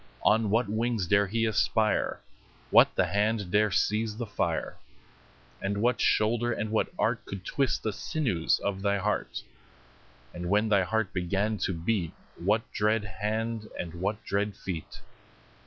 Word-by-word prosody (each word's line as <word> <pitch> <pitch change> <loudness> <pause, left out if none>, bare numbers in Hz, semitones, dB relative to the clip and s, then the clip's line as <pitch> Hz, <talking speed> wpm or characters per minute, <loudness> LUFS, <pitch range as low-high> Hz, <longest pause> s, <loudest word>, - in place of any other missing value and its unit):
On 110 -1 +4
what 115 +2 +2
wings 110 -1 0
dare 100 +3 +3
he 115 +3 0
aspire? 110 0 +1 0.5
What - - +6
the - - +3
hand 105 -1 0
dare 105 +1 +4
seize 105 +3 0
the 120 - -3
fire? 105 -1 -2 0.9
And 100 +1 -1
what 120 +3 +1
shoulder 120 +2 +2
and 110 -1 -2
what 110 - +2
art - - 0
Could 95 -1 -7
twist 135 -3 0
the 110 - -1
sinews 110 - 0
of 95 -1 -3
thy 100 0 +1
heart? 105 +2 -2 0.9
10 85 - -7
And 90 - -3
when 105 +3 +3
thy 100 -2 +4
heart 110 +2 -1
began 100 +4 0
to 95 - 0
beat, 85 0 -1 0.3
What 105 +6 +2
dread 105 +1 +1
hand 110 +2 -3
and 85 -2 -4
what 100 +5 -3
dread 100 0 -1
feet? 90 -6 -6
105 Hz, 155 wpm, -28 LUFS, 100-110 Hz, 0.9 s, What